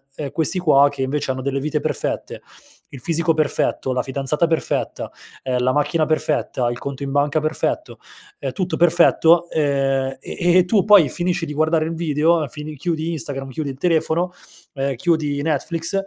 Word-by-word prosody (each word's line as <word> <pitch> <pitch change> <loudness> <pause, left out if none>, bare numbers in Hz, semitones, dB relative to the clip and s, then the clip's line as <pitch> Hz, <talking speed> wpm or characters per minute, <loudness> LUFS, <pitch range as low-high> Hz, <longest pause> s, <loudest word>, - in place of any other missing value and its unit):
ehm, 140 -3 -5
questi 165 +4 +1
qua 145 -4 +5
che 140 -1 -7
invece 140 +1 -2
hanno 130 0 -4
delle 140 0 -1
vite 150 +1 -1
perfette, - - -3 0.5
il 135 -3 -10
fisico 165 +2 +1
perfetto, 140 -3 0
la 125 - 0
fidanzata 140 +5 -1
perfetta, 165 -1 -2 0.3
ehm, 125 -1 -1
la 130 +1 +1
macchina 150 +2 +1
perfetta, 150 -5 0
il 120 - -6
conto 140 +1 -6
in 135 - -4
banca 145 +2 +1
perfetto, 155 +1 -2 0.4
ehm, 135 -2 -3
tutto 185 -1 -2
perfetto, 170 0 +4
ehm, 135 -3 0
e - - -8
e 175 0 +4
e 180 - +3
tu 195 -1 +2
poi 205 -7 +6
finisci 175 -1 -2
di 150 - -6
guardare 155 +1 +1
il 165 - -3
video, 160 -1 +1
fin 150 +3 -8
chiudi 165 +1 -2
Instagram, 135 -2 -5
chiudi 145 +2 -4
il 130 - -7
telefono, 170 +2 +1 0.4
ehm, 135 -1 -2
chiudi 150 -1 0
Netflix, 160 +4 -2
150 Hz, 175 wpm, -20 LUFS, 140-165 Hz, 0.5 s, poi